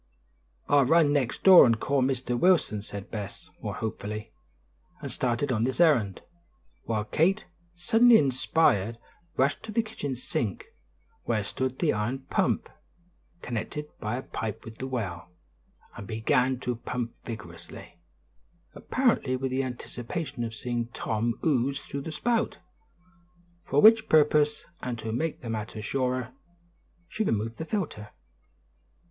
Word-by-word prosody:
"I'll 140 -2 +5
run 155 +1 +4
next 135 -5 -1
door 190 -2 +10
and 115 -3 +3
call 140 +2 +1
Mr. 130 -1 0
Wilson," 155 - +3
said 100 -1 -8
Bess, 105 -3 -7
more - - -4
hopefully, 105 -1 -5 0.7
and - - -6
started 125 +2 0
on 110 -3 0
this 130 +5 -1
errand, 120 - +3 0.6
while 110 -2 -1
Kate, 175 - +1 0.3
suddenly 225 +7 +6
inspired, 130 - +2 0.4
rushed 135 +2 +2
to 220 - -7
the 230 +1 +1
kitchen 180 -11 -4
sink, 115 -5 -3 0.6
where 110 -3 0
stood 130 +5 -3
the 165 - +2
iron 110 +6 -2
pump, - - +1 0.8
connected 135 +6 -4
by 110 +2 -2
a 130 - -4
pipe 110 0 -5
with 110 0 -10
the 130 - -3
well, 100 -10 -4 0.7
and 100 - -8
began 125 +4 +1
to 125 -2 -2
pump 120 0 -4
vigorously, 85 -7 -9 0.7
apparently 235 - +1
with 130 0 -2
the 130 +1 +1
anticipation 125 +2 -5
of 115 -1 -4
seeing 120 +1 -2
Tom 115 +1 -1
ooze 140 -2 +2
through 140 - -6
the 160 - -6
spout, 230 +8 0 1.1
for 145 - +2
which 220 0 +7
purpose, 150 -1 +4 0.2
and 125 -2 -3
to 110 0 -5
make 155 +8 -2
the 120 - -6
matter 110 0 -4
surer, 130 +2 -2 0.7
she 220 - -2
removed 115 - -1
the 160 - -3
filter. 155 - -3
125 Hz, 140 wpm, -27 LUFS, 110-150 Hz, 1.1 s, door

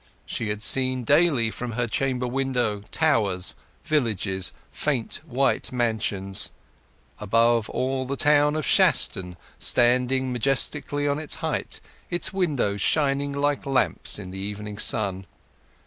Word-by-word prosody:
She 110 - -4
had 105 +1 -3
seen 130 0 +1
daily 140 -4 +3
from 120 0 -6
her 120 +2 -1
chamber 125 +2 -1
window 125 -5 -1
towers, 105 - +1 0.3
villages, 105 - 0 0.2
faint 135 -5 -3
white 135 0 0
mansions; 110 -5 0 0.7
above 115 +2 +2
all, 130 0 -2
the 140 - -2
town 150 +1 +3
of 155 - -2
Shaston 90 -1 +3 0.2
standing 125 +2 +2
majestically 145 +3 0
on 145 +1 0
its 155 - -3
height; - - -3 0.3
its 175 +2 +2
windows 140 - -1
shining 140 -2 +1
like 145 0 0
lamps 135 -1 0
in 90 - -8
the 95 - -7
evening 105 +1 -6
sun. 95 -4 +1
125 Hz, 125 wpm, -24 LUFS, 105-140 Hz, 0.7 s, daily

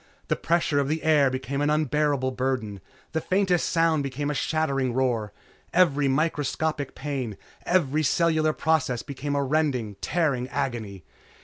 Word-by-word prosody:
The - - +2
pressure 165 -4 +1
of 140 - 0
the 155 +2 -2
air 150 -4 +4
became 130 +2 -3
an 145 - +2
unbearable 150 -3 +1
burden, 125 -6 -2 0.3
the 160 - -1
faintest 185 -1 +1
sound 165 -2 +2
became 140 +1 -2
a - - -1
shattering 135 -5 0
roar. 120 -5 0 0.4
Every 145 -6 +4
microscopic 150 0 -1
pain, 130 -8 -4 0.3
every 155 -4 +2
cellular 155 0 +2
process 140 -8 0
became 140 +1 -4
a 140 - +1
rending, 135 -8 0
tearing 145 -6 0
agony. 120 - -4
145 Hz, 140 wpm, -26 LUFS, 130-155 Hz, 0.4 s, air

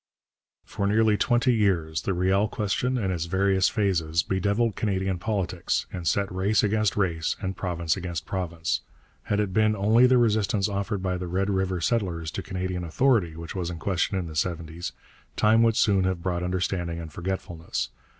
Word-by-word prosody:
For 100 - -2
nearly 110 +1 +3
twenty 120 +3 +2
years 85 -8 +1
the 95 +2 -1
Riel 95 +4 +2
question 115 +6 -1
in 95 -5 -1
its 85 -2 -2
various 95 +1 +2
phases 85 -6 +1
bedevilled 100 +4 0
Canadian 95 -3 -1
politics 100 -3 -1
and 90 -2 -4
set 100 +4 +1
race 95 +4 +2
against 105 -1 +1
race 85 -5 0
and 95 -1 -3
province 85 -4 -1
against 90 -4 -5
province. 85 -4 -2 0.4
Had 105 - 0
it 100 -3 -1
been 110 +1 +3
only 110 +5 +5
the 130 0 +4
resistance 110 -4 +2
offered 100 -1 -2
by 90 -1 0
the 90 0 -5
Red 95 +3 0
River 95 -1 0
settlers 85 -5 -1
to - - -4
Canadian 95 -1 -3
authority 90 -1 +2
which 85 0 -7
was 90 -3 -3
in 85 - -5
question 95 +3 0
in 90 - -2
the 80 -2 -8
seventies, 85 +1 -3 0.4
time 110 +1 +4
would 115 -1 +4
soon 100 -5 +3
have 95 -2 -1
brought 90 -2 -1
understanding 90 -1 -2
and 80 -2 -8
forgetfulness. 90 -2 -4
95 Hz, 175 wpm, -26 LUFS, 85-105 Hz, 0.4 s, only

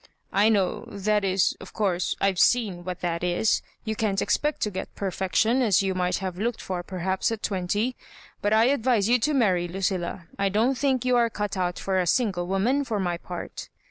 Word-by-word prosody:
" - - -32
I 205 +3 +4
know 195 -5 +1
— - - -12
^that 210 +1 0
is, 190 -2 +2
of - - -11
course, 185 -4 0
I've 195 -2 +1
seen 205 -8 +2
what 180 0 -5
that 170 -1 -2
is; 180 +5 +2 0.2
you 220 0 -2
can't 205 -3 0
expect 300 +8 0
to 210 - 0
get 185 - -6
perfection, 200 +6 +1
as 205 -6 +3
you 190 -1 0
might 180 -1 0
have 185 -1 -5
looked 235 +2 -1
for 185 -2 -4
perhaps 190 +3 -2
at 225 -2 -4
twenty; 205 +6 -1 0.5
but 205 - 0
I 220 +1 +5
advise 245 -5 +2
you 245 +2 +4
to 300 +6 +1
marry, 185 -9 +2
Lucilla. 180 -1 -2
I 200 0 +2
don't 225 +7 +2
think 260 -1 0
you 250 -1 +3
are 235 -1 +3
cut 210 -2 -3
out 180 -2 -1
for 190 -1 0
a 180 - 0
sin 230 +3 +2
gle 175 -1 -4
woman, 225 +10 +1
for 225 -6 -2
my 175 -2 -1
part." 175 0 -7
195 Hz, 215 wpm, -25 LUFS, 185-225 Hz, 0.5 s, I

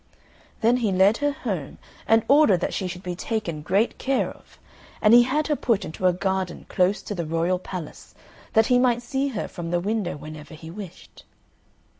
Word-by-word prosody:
Then 235 +2 +4
he 225 -5 0
led 190 +4 +4
her 290 0 +1
home 195 - -5 0.3
and 225 0 +4
ordered 280 - +5
that - - -2
she 190 - -2
should 180 +1 -7
be 180 - -3
taken 180 -6 -3
great 200 +9 0
care 270 0 0
of; - - -19 0.4
and 210 +1 +5
he 240 - +9
had 280 +5 +1
her 300 - +1
put 230 -6 0
into 185 +4 -1
a - - +5
garden 190 0 -2
close 185 +2 +1
to - - -5
the 175 -4 -3
royal 165 +3 0
palace, 180 -4 -8 0.4
that 220 0 +5
he 250 +1 +4
might 245 -1 +2
see 270 +3 -1
her 230 -7 -3
from 170 -2 -6
the 175 0 +1
window 200 -3 -2
whenever 155 +1 -10
he 160 +1 -10
wished. 185 -2 -11
195 Hz, 195 wpm, -24 LUFS, 175-240 Hz, 0.4 s, he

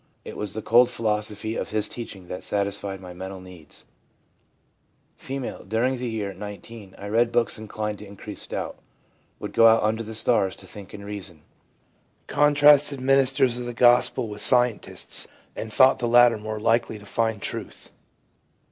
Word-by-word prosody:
It - - -8
was 105 -1 -4
the 110 - -5
cold 120 +2 +5
philosophy 110 -1 -2
of - - -4
his 110 -1 +1
teaching 100 -6 -8
that 90 - -7
satisfied 100 -1 -2
my 90 -1 -10
mental 95 +1 -8
needs/ 90 -5 -9 1.4
F. - - -13 0.4
'During 120 +5 0
the 125 -1 -3
year 105 -3 -4
(19) 105 +1 -10
I 100 - -9
read 115 +3 +2
books 120 -2 0
inclined 105 -1 -5
to 105 - -10
increase 100 0 -8
doubt. - - -5 0.6
Would - - -7
go 115 - +6
out 115 -1 +4
under 110 +1 0
the 110 0 -7
stars 105 -4 +1
to - - -13
think 100 0 -11
and 100 -1 -10
reason. 100 -6 -8 0.8
Contrasted 145 -1 +4
ministers 130 -2 +2
of 125 - -5
the 120 -1 -6
Gospel 120 -1 +4
with 105 -1 -6
scientists, 125 -3 +3 0.3
and 110 - -6
thought 130 +3 +5
the 120 - -1
latter 120 -1 +5
more 110 0 -5
likely 115 0 +1
to 105 - -14
find 110 0 -1
truth. - - -6
110 Hz, 165 wpm, -24 LUFS, 100-120 Hz, 1.4 s, go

